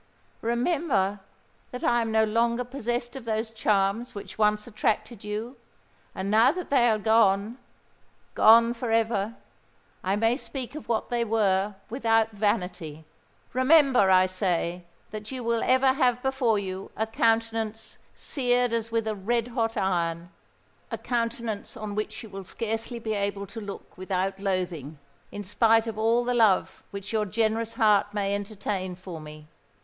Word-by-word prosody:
"Remember 235 - 0 0.5
that 250 - -7
I 240 0 +3
am 225 -1 -2
no 220 0 +4
longer 235 +3 +1
possessed 240 -1 -3
of 265 - -7
those 220 0 -2
charms 210 +1 0
which 200 -2 -8
once 210 0 +2
attracted 215 -1 -2
you; 215 +5 -5 0.6
and 190 +1 -3
now 225 +5 +6
that 355 -1 -6
they 245 -4 +5
are 220 - +3
gone—gone 220 +2 +2
for 240 0 -4
ever—I 225 -3 -3
may 225 +3 +2
speak 270 -3 -6
of 305 -4 -9
what 230 +1 -1
they 240 -1 +1
were 205 -3 +1 0.2
without 225 -2 +2
vanity! 180 -7 -2 0.5
Remember, 260 -5 +5
I 185 0 +6
say, 180 -2 -1 0.3
that 215 0 -7
you 255 -2 -5
will 230 0 0
ever 260 +1 +4
have 250 -3 +1
before 265 -5 +1
you 190 -1 -5
a 220 - +1
countenance 225 0 -1 0.2
seared 245 -3 0
as 230 0 -2
with 225 -1 0
a 215 - 0
red 230 +4 -1
hot 230 -2 -1
iron,—a 170 -2 -4
countenance 230 -3 -3
on 215 -1 -5
which 215 +2 -4
you 225 - -10
will 195 0 -7
scarcely 225 +4 -4
be 225 -1 -3
able 200 -1 -2
to 220 +3 -8
look 200 -1 -9
without 190 +1 -2
loathing 180 -7 -3 0.3
in 205 - -6
spite 225 +3 +3
of 220 -2 -5
all 230 +2 +3
the 245 +1 0
love 220 -6 +2
which 200 +2 -7
your 215 -1 +1
generous 225 +2 0
heart 210 -2 +3
may 200 -1 0
entertain 200 -2 -3
for 180 -3 -9
me! 155 0 -11
220 Hz, 150 wpm, -26 LUFS, 200-235 Hz, 0.6 s, now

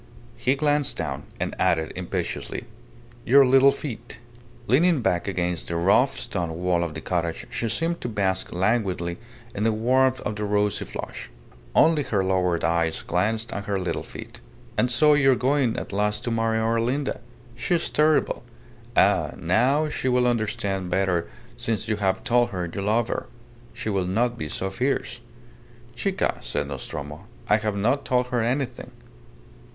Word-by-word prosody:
He 125 +3 +1
glanced 145 -1 +1
down, - - -3
and - - -2
added, 85 -4 +1
impetuously - - -4 0.6
"Your 135 +3 +6
little 135 +2 +6
feet!" 120 -5 -7 0.5
Leaning 155 +4 +3
back 90 -5 +1
against 90 -3 -2
the 85 - -3
rough 85 +4 +3
stone 85 -2 -3
wall 90 -1 +1
of 80 -3 -4
the 80 - -5
cottage, 85 -2 -2
she 115 - -2
seemed 165 +9 -1
to 120 - -3
bask 95 -3 0
languidly 95 -3 0 0.3
in 100 - -2
the 115 - +3
warmth 130 +4 +2
of 105 - -3
the 105 - -3
rosy 105 0 0
flush. - - -7 0.5
Only 160 -2 +5
her 105 -8 0
lowered 90 -2 +1
eyes 85 -1 +1
glanced 110 +6 0
at 100 - -4
her 100 -1 -1
little 90 -2 -2
feet. - - -10 0.4
"And 125 - +2
so 150 +5 +5
you 135 -2 +5
are - - +1
going 130 -2 +1
at - - -5
last 105 +1 0
to 120 - -2
marry 115 0 +1
our 115 +1 +1
Linda. 135 +4 -1 0.4
She 125 +8 0
is 170 - -1
terrible. 155 0 +2 0.6
Ah! - - +4
now 130 - +2
she 130 -3 -2
will 125 0 +3
understand 105 -5 -1
better 90 -3 +1 0.3
since 115 0 -2
you 110 -1 0
have 95 -2 0
told 120 -1 +3
her 90 -5 -3
you 100 - -3
love 110 +3 +1
her. - - -3 0.4
She 110 -1 -4
will 95 -2 0
not 120 +6 +1
be 75 -10 -5
so 95 +5 -3
fierce." 125 +2 -1 0.7
"Chica!" 195 +8 -1
said - - -3
Nostromo, 75 +6 -7 0.2
"I 105 - +5
have 105 -2 -2
not 120 +8 +1
told 125 0 +1
her 120 -2 0
anything." 125 +3 -2
110 Hz, 165 wpm, -25 LUFS, 95-125 Hz, 0.7 s, Your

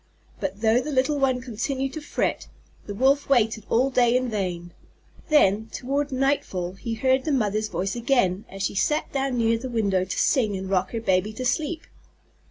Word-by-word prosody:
But 195 +1 -4
though 225 +2 +3
the 300 - -5
little 280 +2 +1
one 260 -2 +1
continued 260 +3 -3
to 315 - -5
fret, 295 - -2 0.4
the 205 - -5
Wolf 275 +5 +2
waited 220 -5 +2
all 255 +4 +2
day 245 -1 +4
in 255 -1 -1
vain. 180 -5 -3 0.6
Then, 220 -8 +4
toward 280 +4 -2
nightfall, 255 -10 -1
he 225 +4 -5
heard 260 +3 +2
the 310 - -1
Mother's 215 -4 0
voice 190 +1 -3
again 230 -6 +1
as 195 0 -6
she - - -1
sat 300 +10 0
down 270 -2 -1
near 230 -1 +2
the 260 +2 -5
window 200 -6 +1
to 185 - -5
sing 215 -8 +2
and 190 0 -6
rock 185 -1 +1
her 230 - -2
baby 190 0 +1
to 255 +4 -5
sleep. 315 +5 -1
235 Hz, 185 wpm, -24 LUFS, 200-270 Hz, 0.6 s, day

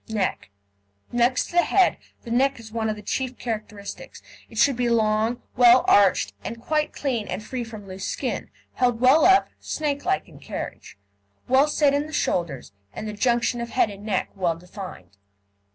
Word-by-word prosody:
NECK 205 - -2 0.6
Next 240 +1 +2
to 350 - -6
the - - +8
head, 375 +2 +3 0.3
the 235 - -8
neck 270 +2 +2
is 220 -1 -11
one 220 -1 -1
of 215 - -1
the 210 - -11
chief 255 +4 -3
characteristics. 215 -3 -6 0.3
It 225 - -12
should 275 +4 +4
be 245 0 0
long, 220 +1 +1
well 245 0 +6
arched, 190 - +4
and 230 - -6
quite 305 +5 0
clean 245 -7 -2
and 215 - -4
free 245 +2 -4
from 215 -3 -10
loose 190 0 -6
skin, - - -3 0.2
held 245 -2 +1
well 260 +6 +5
up, 380 +1 +5
snakelike 305 +5 -2
in - - -15
carriage, - - -7 0.5
well 265 +3 +5
set 295 -1 +2
in 290 +1 0
the 310 - -11
shoulders, 165 - -1 0.2
and 215 - -6
the 210 - -4
junction 240 +2 +1
of 235 - -4
head 215 - +2
and 200 0 -11
neck 210 -3 -1
well 175 -4 0
defined. 175 - -10
235 Hz, 180 wpm, -24 LUFS, 210-260 Hz, 0.6 s, the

